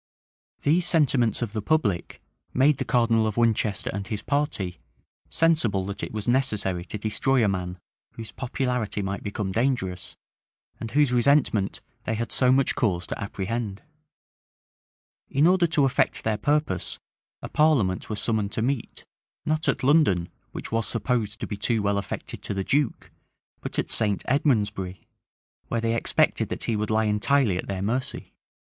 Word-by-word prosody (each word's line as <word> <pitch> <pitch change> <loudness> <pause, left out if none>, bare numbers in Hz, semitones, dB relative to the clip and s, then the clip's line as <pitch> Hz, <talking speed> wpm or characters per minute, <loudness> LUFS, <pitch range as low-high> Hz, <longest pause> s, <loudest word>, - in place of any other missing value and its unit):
These 165 +5 +3
sentiments 130 -9 +2
of 110 -3 -4
the 110 - -2
public 105 - 0 0.3
made 135 +2 +4
the 135 - -1
cardinal 115 -2 +3
of 110 - -3
Winchester 110 -3 +1
and 100 -1 -4
his 105 -1 -4
party 120 - -1 0.5
sensible 120 - +2
that 100 +1 -5
it - - -4
was 105 -2 -5
necessary 105 -8 +1
to 105 - -5
destroy 110 +4 +1
a - - +3
man 90 -2 -2 0.4
whose 115 -1 -8
popularity 125 -5 -2
might 100 +1 -3
become 100 -1 -3
dangerous, 115 -6 -1 0.6
and 115 - -5
whose 145 +1 +3
resentment 120 -5 +2 0.2
they 115 - -1
had 115 +1 -3
so 125 -1 +3
much 135 +1 +3
cause 90 -7 0
to - - -5
apprehend. 100 +2 -4 1.5
In 140 +3 +3
order 180 0 +4
to 150 -3 +2
effect 135 - +1
their 110 -1 0
purpose, 145 - 0 0.5
a - - -3
parliament 135 -13 +2
was 105 -2 -3
summoned 110 -3 0
to 110 - -1
meet, 130 -1 -3 0.4
not 155 0 +1
at - - -1
London, 130 - +3 0.2
which - - -7
was 115 -1 0
supposed 115 -1 -1
to - - -1
be 105 - -5
too 115 -1 +1
well 100 0 +1
affected - - -6
to 100 - -4
the 95 - -1
duke, 140 +2 0 0.5
but - - -6
at - - -1
St. 105 -3 +1
Edmondsbury, 105 -9 0 0.6
where 115 - -1
they 115 0 +1
expected 115 - +1
that - - -4
he 115 - 0
would 105 0 -2
lie 110 0 +2
entirely 105 -1 +2
at - - -5
their 95 -1 -3
mercy. 125 +6 -3
115 Hz, 165 wpm, -25 LUFS, 100-135 Hz, 1.5 s, made